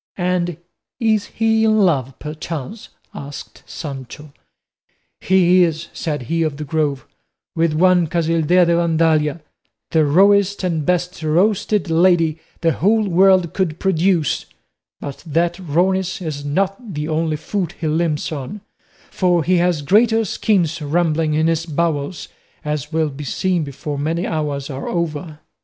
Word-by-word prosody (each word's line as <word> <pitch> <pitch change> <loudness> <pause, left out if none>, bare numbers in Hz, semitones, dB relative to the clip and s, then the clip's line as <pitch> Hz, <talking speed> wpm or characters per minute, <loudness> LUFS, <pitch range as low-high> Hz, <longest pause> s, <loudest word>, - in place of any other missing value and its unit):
"And 175 -2 -1 0.4
is 220 -3 +1
he 220 0 +1
in 215 0 +3
love 140 - +1
perchance?" 155 - -7 0.2
asked 140 +1 -9
Sancho. 140 -1 -8 0.9
"He 185 -1 +4
is," 165 -1 -2
said 150 -5 -3
of 160 -3 0
the 155 - -5
Grove, 145 -3 -1 0.5
"with 165 -1 +1
one 180 +1 +3
Casildea 165 +2 +2
de 170 0 +2
Vandalia, 160 -2 +1 0.5
the 160 -1 +3
rawest 200 +6 +3
and 165 -5 -1
best 180 0 -1
roasted 185 +3 +1
lady 165 -2 +3 0.2
the 165 -1 +3
whole 210 +6 +2
world 185 -2 +4
could 175 -5 -1
produce; 180 -4 +1 0.5
but 140 -1 -7
that 170 +2 0
rawness 185 +2 0
is 155 -5 -5
not 195 - -2
the 150 +1 -3
only 160 -1 -1
foot 180 +2 -3
he 170 - -7
limps 155 0 0
on, 155 +8 -6 0.5
for 175 -3 +2
he 180 +4 +2
has 175 -3 +1
greater 225 - +3
schemes 175 -5 0
rumbling 155 0 0
in 155 +1 +2
his 165 0 0
bowels, 160 0 -2 0.4
as 150 0 -3
will 160 -1 +1
be 140 +2 -8
seen 180 +4 -1
before 140 +1 -5
many 165 +4 -1
hours 145 -3 -2
are 135 -2 -5
over." 160 -2 -3
165 Hz, 140 wpm, -19 LUFS, 150-185 Hz, 0.9 s, He